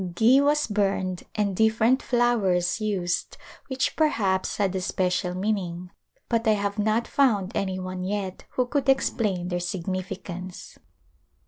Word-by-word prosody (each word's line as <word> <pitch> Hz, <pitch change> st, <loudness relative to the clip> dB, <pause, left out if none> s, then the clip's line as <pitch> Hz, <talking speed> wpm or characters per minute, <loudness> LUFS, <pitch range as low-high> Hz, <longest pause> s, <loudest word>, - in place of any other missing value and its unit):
Ghi 245 Hz, +8 st, +5 dB
was 295 Hz, +1 st, +3 dB
burned 195 Hz, -3 st, -1 dB
and 205 Hz, -3 st, 0 dB
different 220 Hz, +5 st, +3 dB
flowers 220 Hz, -7 st, +1 dB
used 190 Hz, -5 st, -1 dB, 0.3 s
which 260 Hz, 0 st, -1 dB
per 315 Hz, -, +4 dB
haps 190 Hz, -9 st, 0 dB
had 195 Hz, -2 st, 0 dB
a 190 Hz, -, -1 dB
special 180 Hz, -1 st, -1 dB
meaning 185 Hz, -3 st, -2 dB, 0.4 s
but 230 Hz, -1 st, 0 dB
I 215 Hz, -, +6 dB
have 200 Hz, 0 st, -2 dB
not 215 Hz, +3 st, +1 dB
found 215 Hz, -9 st, +2 dB
any 190 Hz, -1 st, -1 dB
one 185 Hz, 0 st, -5 dB
yet 190 Hz, -1 st, -3 dB
who 255 Hz, -, +1 dB
could 275 Hz, +2 st, -1 dB
explain 205 Hz, -9 st, +1 dB
their 175 Hz, -1 st, -1 dB
significance. 185 Hz, 0 st, -5 dB
200 Hz, 140 wpm, -25 LUFS, 185-225 Hz, 0.4 s, I